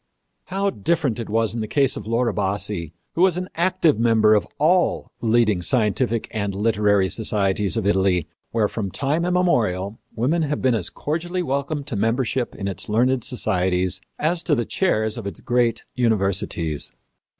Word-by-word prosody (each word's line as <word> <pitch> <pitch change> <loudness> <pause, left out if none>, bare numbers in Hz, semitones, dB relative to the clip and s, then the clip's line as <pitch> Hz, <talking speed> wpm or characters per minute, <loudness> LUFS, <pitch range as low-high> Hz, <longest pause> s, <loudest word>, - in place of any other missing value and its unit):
How 195 +1 -1
different 135 - 0
it 115 - -5
was 110 0 +1
in 115 - -3
the 110 - -3
case 135 +3 +2
of - - -7
Laura 115 +1 +1
Bassi, 95 -4 -2 0.2
who 170 - -1
was 185 -2 +4
an 180 0 -4
active 170 - +2
member 110 -2 +4
of 105 - +2
all 175 +4 +2
the 115 - -2
leading 110 -5 +3
scientific 115 +2 +1
and 100 -2 -2
literary 105 -2 +2
societies 100 -1 0
of 110 - -1
Italy, 95 -4 +2 0.2
where 110 -2 +1
from 105 -2 -4
time 145 - -1
immemorial 115 - +1 0.2
women 140 +9 +1
have 150 -1 -1
been 130 -2 +2
as 100 -6 -1
cordially 175 +4 -3
welcomed 140 0 -2
to 140 -5 -4
membership 120 +4 0
in 100 - -4
its 95 0 -4
learned 125 +3 +2
societies 90 -5 0 0.2
as 165 +3 0
to 165 -3 +1
the 120 -3 -1
chairs 110 - 0
of 105 - -6
its 100 - -6
great 120 -2 +1
universities. 95 - 0
115 Hz, 170 wpm, -22 LUFS, 100-140 Hz, 0.2 s, was